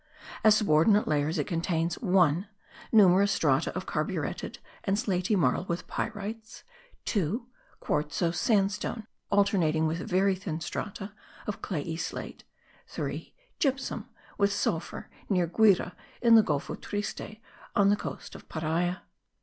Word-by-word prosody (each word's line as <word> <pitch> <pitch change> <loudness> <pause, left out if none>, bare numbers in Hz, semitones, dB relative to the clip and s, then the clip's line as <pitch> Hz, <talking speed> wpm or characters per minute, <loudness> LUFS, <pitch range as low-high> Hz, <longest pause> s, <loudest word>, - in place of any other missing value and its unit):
As 215 -1 +7
subordinate 205 +3 +4
layers 150 +2 +1
it 150 - 0
contains 165 -1 -1
(1) 180 - +3 0.4
numerous 200 -2 +6
strata - - +2
of - - -3
carburetted - - -3 0.3
and 195 0 +1
slaty 200 -2 0
marl 150 -4 +2
with 170 -1 -3
pyrites; 220 +1 -5 0.4
(2) 205 - -1 0.3
quartzose 160 +3 -1
sandstone, 205 +2 +1 0.2
alternating 180 -6 +3
with 160 +2 -1
very 190 +2 +2
thin 180 -4 -4
strata 195 +4 -5 0.3
of 210 - -4
clayey 160 -2 -3
slate; - - -5 0.4
(3) - - -5 0.3
gypsum 270 -3 -1 0.3
with 200 0 +3
sulphur 175 -4 -2 0.2
near 180 -4 +3
Guire 190 0 +3 0.3
in 235 -1 +5
the 225 - +9
Golfo 145 -8 -2
Triste 210 +1 -5 0.4
on 200 -1 +5
the - - +4
coast - - -7
of - - -12
Paria. 165 +3 -1
190 Hz, 125 wpm, -29 LUFS, 165-210 Hz, 0.4 s, the